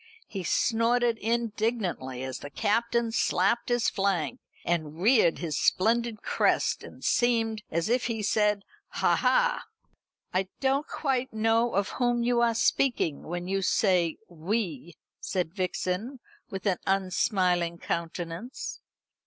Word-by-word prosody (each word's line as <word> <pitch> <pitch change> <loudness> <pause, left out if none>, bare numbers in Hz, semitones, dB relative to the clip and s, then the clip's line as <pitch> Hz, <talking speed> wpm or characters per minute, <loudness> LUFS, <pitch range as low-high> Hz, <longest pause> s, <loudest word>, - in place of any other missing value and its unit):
He 195 -3 -6
snorted 230 +4 +2
indignantly 215 - -1
as 130 -1 -5
the 145 - -8
Captain 230 +7 0
slapped 225 +2 +1
his 240 -1 +2
flank, 190 -7 0 0.3
and 160 -2 -1
reared 210 -4 +4
his 160 -5 -2
splendid 230 +2 +1
crest, - - +1
and - - -12
seemed 225 -3 +1
as 170 +3 -1
if 245 +2 +1
he 225 -3 -2
said 210 -1 +2 0.3
"Ha, - - +2
ha!" - - +2 0.7
"I 185 +1 +1
don't 275 +2 +1
quite 260 -3 -1
know 225 +1 +2
of 200 0 +1
whom 240 -1 0
you 240 0 +2
are 230 -1 +3
speaking 230 - +1
when 175 +2 -5
you 195 +1 0
say 180 -4 +2
'we,'" 175 - -3 0.2
said 180 -4 -2
Vixen, 190 +6 -2 0.3
with 190 +1 -6
an 190 -3 +1
unsmiling 185 -2 +1
countenance. 170 +7 -4
210 Hz, 130 wpm, -28 LUFS, 175-235 Hz, 0.7 s, reared